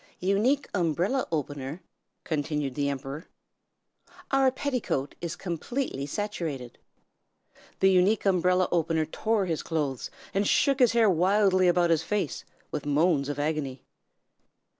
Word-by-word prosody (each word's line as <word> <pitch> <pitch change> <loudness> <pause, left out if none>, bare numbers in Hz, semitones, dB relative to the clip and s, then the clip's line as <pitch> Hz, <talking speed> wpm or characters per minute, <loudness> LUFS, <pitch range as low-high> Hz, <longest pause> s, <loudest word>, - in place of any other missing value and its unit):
"'Unique 215 +10 +1
Umbrella 180 - 0
Opener,' 145 +1 -4 0.4
continued 150 -3 -2
the 140 +1 0
Emperor, 140 +4 -5 1.0
'our 270 -1 +4
petticoat 255 - -2
is 170 -2 -3
completely 175 - -3
saturated.' 160 - -4 1.0
"The 190 0 +6
Unique 190 +4 +3
Umbrella 180 -1 +3
Opener 165 -2 +1
tore 215 +5 0
his 165 -4 -2
clothes, 145 -6 -2 0.2
and 200 +1 +1
shook 275 -1 +3
his 245 -3 +5
hair 230 -2 +4
wildly 185 +1 +3
about 175 -1 +3
his 160 -2 +3
face, 195 -1 -2 0.3
with 145 - -3
moans 145 -1 +2
of 145 - -3
agony. 145 -3 -2
175 Hz, 120 wpm, -27 LUFS, 150-200 Hz, 1.0 s, The